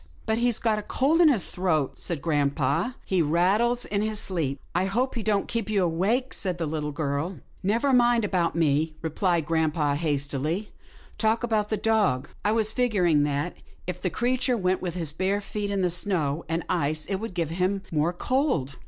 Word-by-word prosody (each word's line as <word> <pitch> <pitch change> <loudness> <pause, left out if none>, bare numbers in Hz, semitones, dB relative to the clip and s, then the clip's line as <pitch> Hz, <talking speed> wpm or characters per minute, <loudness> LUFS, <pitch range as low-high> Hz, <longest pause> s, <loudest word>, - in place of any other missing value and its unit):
" - - -28
But 220 +1 0
he's 240 -1 +3
got 220 -2 +1
a - - -4
cold 295 +10 +2
in 330 - +7
his 235 -10 +1
throat," 160 -7 -1
said 165 -5 -4
grampa, 145 - 0
" - - -31
he 185 -2 +1
rattles 195 +10 +2
in 200 0 -1
his 215 0 -1
sleep." 155 -9 -1
I 180 +2 +1
hope 240 +7 0
he 235 - -3
don't 210 -2 0
keep 230 -3 -3
you 200 -3 +2
awake," 200 +10 0
said 185 -3 0
the 165 - -2
little 150 -1 -3
girl. 145 +4 -2
" - - -31
Never 260 +5 +2
mind 240 -2 +4
about 180 -5 0
me," 155 -1 +1
replied 165 0 0
grampa, 155 -2 +1
hastily. 150 +5 -1 0.2
" - - -24
Talk 220 +2 +2
about 215 -3 0
the 215 - 0
dog. 205 - +1
I 210 - +2
was 220 -1 +2
figuring 185 - +2
that, 145 +4 -1 0.3
if 180 0 -5
the 185 - 0
creature 245 - 0
went 185 -2 0
with 175 -2 -3
his 165 -5 -1
bare 190 +4 0
feet 205 0 -4
in 200 -1 0
the 180 - +1
snow 170 -4 -1
and 165 +1 -1
ice, 155 -3 0
it 195 - -2
would 215 -2 -6
give 165 -3 -1
him 185 +3 0
more 155 +1 +1
cold." 180 - -1
185 Hz, 205 wpm, -26 LUFS, 160-220 Hz, 0.3 s, in